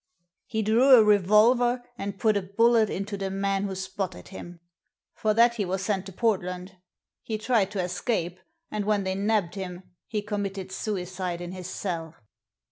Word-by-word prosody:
He 220 -1 -1
drew 240 +6 +6
a 225 - +7
revolver 215 +5 +4
and 200 -3 -5
put 215 +1 +2
a 200 - +1
bullet 220 +3 +3
into 200 +2 -4
the 195 -1 -3
man 195 0 -1
who 195 -1 -4
spotted 190 - -5
him. 175 - -9 0.5
For 215 -1 0
that 235 +1 +5
he 210 - 0
was 190 +1 -2
sent 195 -2 -1
to - - -8
Port 220 +1 +1
land. 180 +1 -6 0.5
He 220 - -3
tried 215 -3 +1
to 195 -3 -2
escape, 180 -1 -2 0.3
and 210 -1 -2
when 210 -1 +1
they 190 0 -1
nabbed 200 -3 0
him 185 -2 -6 0.2
he 210 -2 -2
committed 200 -2 -4
suicide 185 -3 -3
in 175 0 -6
his 185 -1 -7
cell." 165 -4 -4
195 Hz, 175 wpm, -26 LUFS, 185-215 Hz, 0.5 s, a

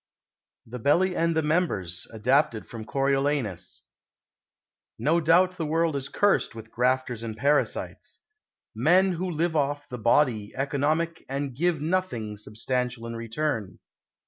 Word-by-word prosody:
_ - - -67 0.7
THE 125 - -5
BELLY 180 +9 +3
AND 165 0 +1
THE 160 - +2
MEMBERS 150 - -1
(ADAPTED 125 +2 +1
FROM 115 -2 -8
"CORIOLANUS") 135 -7 -1 1.1
No 155 +9 +2
doubt 180 +3 +4
the 165 - -2
world 165 0 +1
is 140 -1 -3
cursed 205 - +2
with 115 0 -10
grafters 125 -1 0
and 110 -2 -5
parasites 145 +4 -1 0.5
men 180 - +4
who 180 +1 -2
live 165 0 -1
off 145 0 0
the 125 - -7
body 115 -2 +2
economic 150 +5 0
and 135 -1 -3
give 165 +1 +1
nothing 150 - -1
substantial 115 +3 -3
in 115 0 -5
return. 115 -2 -3
140 Hz, 135 wpm, -26 LUFS, 115-160 Hz, 1.1 s, doubt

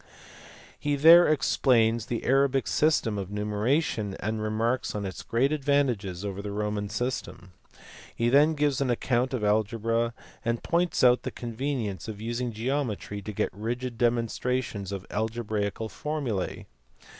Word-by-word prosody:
He 145 0 0
there 165 +5 +8
explains 120 -6 +2
the 120 - -3
Arabic 135 0 +3
system 130 -9 +2
of 95 -1 -5
numeration, 105 +1 -1
and 110 +1 -2
remarks 110 +4 -1
on 105 -1 -3
its 95 - -5
great 130 +5 +1
advantages 130 - 0
over 100 -1 -4
the 105 - -5
Roman 105 0 -2
system. 120 -4 -4 0.6
He 115 - 0
then 145 +5 +5
gives 145 -2 +1
an 135 - +1
account 125 +1 +1
of 125 -5 -2
algebra, 115 +2 +1 0.3
and 115 -1 -1
points 175 -3 +1
out 125 0 +6
the - - -4
convenience 115 - -4
of 105 -2 -6
using 120 +2 -3
geometry 115 -3 -3
to 105 - -6
get 100 - -2
rigid 120 +4 -4
demonstrations 120 -3 -1
of 95 -1 -5
algebraical 110 -1 -2
formulae. 135 -8 -3
115 Hz, 140 wpm, -27 LUFS, 105-130 Hz, 0.6 s, there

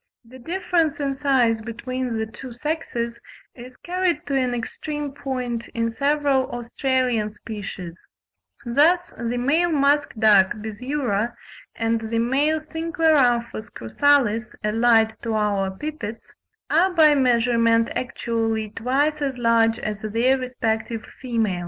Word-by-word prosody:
The 255 +3 -14
difference 335 +1 0
in 280 -1 -1
size 260 -5 +2
between 235 +1 -4
the 220 - -1
two 230 +3 -10
sexes 240 -4 -3 0.3
is 250 +1 -12
carried 360 -3 -1
to 280 - -2
an 255 -2 +1
extreme 295 +4 -4
point 255 -4 -4
in 230 0 0
several 280 0 +1
Australian 240 -2 -1
species; 205 -5 -8 0.6
thus 330 +8 +3
the 235 +1 -3
male 315 +8 +2
musk 290 -1 +2
duck 205 -4 +5
(Biziura), 225 +1 -2 0.4
and 225 0 0
the 230 - -1
male 280 +7 +1
Cincloramphus 310 -9 +1
cruralis 230 - +2 0.2
(allied 225 0 +3
to 225 -2 -2
our 205 -2 +1
pipits) 225 0 -7 0.4
are 360 +4 +4
by 310 -3 +6
measurement 235 -3 +3
actually 225 -3 -2
twice 280 +7 0
as 270 -3 -2
large 230 -1 +3
as 215 -2 -4
their 230 +5 +2
respective 230 -3 -3 0.2
females. 225 -8 -1
245 Hz, 120 wpm, -23 LUFS, 225-285 Hz, 0.6 s, by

